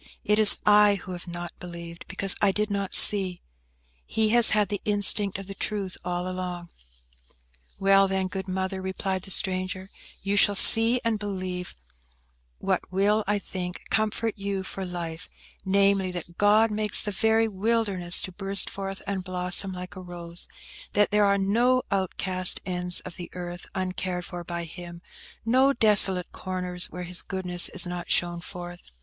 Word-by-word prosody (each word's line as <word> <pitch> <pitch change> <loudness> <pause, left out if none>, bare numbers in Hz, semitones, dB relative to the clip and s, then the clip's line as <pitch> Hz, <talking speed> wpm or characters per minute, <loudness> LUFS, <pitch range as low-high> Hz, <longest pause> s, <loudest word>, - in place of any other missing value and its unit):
It 210 +1 +1
is 215 -1 +8
I 210 -1 +5
who 190 -1 -9
have 180 0 -9
not 175 0 -7
believed, 170 -1 -10
because 195 -1 +1
I 205 - +3
did 210 +1 -3
not 200 -1 -2
see. 190 -4 +7 0.6
He 220 -1 0
has 235 0 +6
had 210 -1 +1
the 205 - -3
instinct 205 -1 +3
of 195 - -9
the 195 - -9
truth 195 -2 -5
all 180 0 -4
along." 180 -1 -6 1.1
"Well, 195 0 +3
then, 190 0 -2
good 190 +1 -6
Mother," 190 0 -4
replied 190 0 -4
the 195 - -11
stranger, 185 0 0 0.3
"you 200 +1 -1
shall 205 0 +4
see 225 +4 +7
and 225 -2 -1
believe 185 - -6 0.8
what - - -1
will, 205 +3 +1
I 210 0 +1
think, 180 -2 -6
comfort 220 +1 -1
you 195 -1 -4
for 190 0 -7
life–namely, 185 +3 -3
that 170 -1 -7
God 215 +2 +3
makes 210 0 +3
the 205 - -3
very 220 +3 +1
wilderness 200 -4 -1
to 185 - -6
burst 195 +1 +1
forth 195 -1 -7
and 195 -2 -4
blossom 180 +1 +1
like 180 0 -9
a 185 - -9
rose: 175 -1 -8 0.5
that 205 0 +2
there 210 0 +3
are 200 0 +2
no 235 +6 +1
outcast 185 -1 0
ends 180 -1 -1
of 180 - -11
the 175 -1 -9
earth, 175 0 -8
uncared 185 -1 -4
for 175 0 -8
by 170 0 -6
Him; 170 +1 -11 0.4
no 260 +4 +3
desolate 200 -6 +3
corners 180 -1 -4
where 180 - -8
His 180 0 +3
goodness 180 -2 0
is 185 -1 +2
not 175 0 -7
shown 175 -1 -1
forth." 175 0 -9
190 Hz, 165 wpm, -25 LUFS, 180-205 Hz, 1.1 s, is